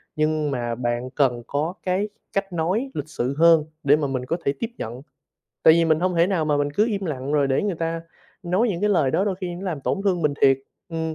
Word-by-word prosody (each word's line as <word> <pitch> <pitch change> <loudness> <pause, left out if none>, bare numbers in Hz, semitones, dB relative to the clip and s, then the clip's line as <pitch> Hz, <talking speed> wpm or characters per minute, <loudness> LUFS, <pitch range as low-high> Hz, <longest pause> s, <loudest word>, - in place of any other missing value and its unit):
nhưng 155 -1 0
mà 120 -3 -2
bạn 120 +1 -2
cần 130 -3 +1
có 150 +5 -1
cái 190 +3 0 0.2
cách 195 -1 -2
nói 190 +11 -1
lịch 150 0 -4
sự 130 -2 -2
hơn 165 -1 +6 0.2
để 140 0 +5
mà 150 -2 -1
mình 130 -2 -3
có 165 - -1
thể 140 - +2
tiếp 230 - -2
nhận. 120 +3 -6 0.6
Tại 160 - +8
vì 170 0 +3
mình 160 -1 +2
hông 185 0 +1
thể 170 +1 +5
nào 185 -5 0
mà 150 -1 +1
mình 145 0 0
cứ 205 +9 +2
im 200 -4 -2
lặng 140 -4 -3
rồi 145 -2 +3
để 135 0 +1
người 205 -3 -1
ta 165 0 -2 0.4
nói 185 +7 +1
những 180 -5 -2
cái 210 - +2
lời 160 -9 +3
đó, 190 - +1
đôi 200 -2 0
khi 180 -2 -5
nó 175 - -8
làm 170 -7 -3
tổn 195 - -1
thương 180 -4 +1
mình 150 -2 +2
thiệt 135 -1 +5 0.3
ừm, 160 -1 -3
160 Hz, 255 wpm, -23 LUFS, 140-185 Hz, 0.6 s, Tại